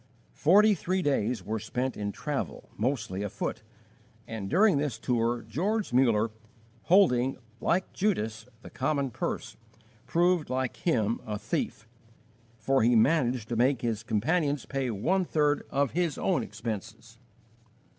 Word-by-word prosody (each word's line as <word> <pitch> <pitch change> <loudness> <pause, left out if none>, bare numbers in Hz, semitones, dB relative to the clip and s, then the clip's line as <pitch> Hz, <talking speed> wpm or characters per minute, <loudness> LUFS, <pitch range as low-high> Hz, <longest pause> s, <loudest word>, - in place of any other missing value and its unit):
Forty 210 +7 +5
three 185 0 -1
days 120 - 0
were 110 +2 -2
spent 125 +5 -3
in 100 -1 -3
travel, 135 - -4
mostly 110 -5 -2
afoot; 105 -1 -3 0.6
and 110 -4 -5
during 195 -4 +4
this 145 -2 -2
tour 120 -1 0
George 205 - -2
Muller, 115 -4 +3 0.5
holding, 135 -9 +4 0.2
like 185 +2 0
Judas, 115 - -1 0.2
the - - -11
common 140 -4 -1
purse, - - -4 0.5
proved, 175 -1 +2
like 130 -1 -2
him, 115 - 0
a 105 -1 -2
thief, 110 +2 -3 0.7
for 135 +5 +1
he 120 +2 +4
managed 120 -1 +2
to 120 - -1
make 125 +2 +2
his 115 -3 -1
companions 145 +7 0
pay 135 -2 -2
one 160 - +1
third 150 -4 +1
of 140 -1 +1
his 170 -2 0
own 185 - +1
expenses. 110 +1 -7
125 Hz, 135 wpm, -28 LUFS, 110-155 Hz, 0.7 s, Forty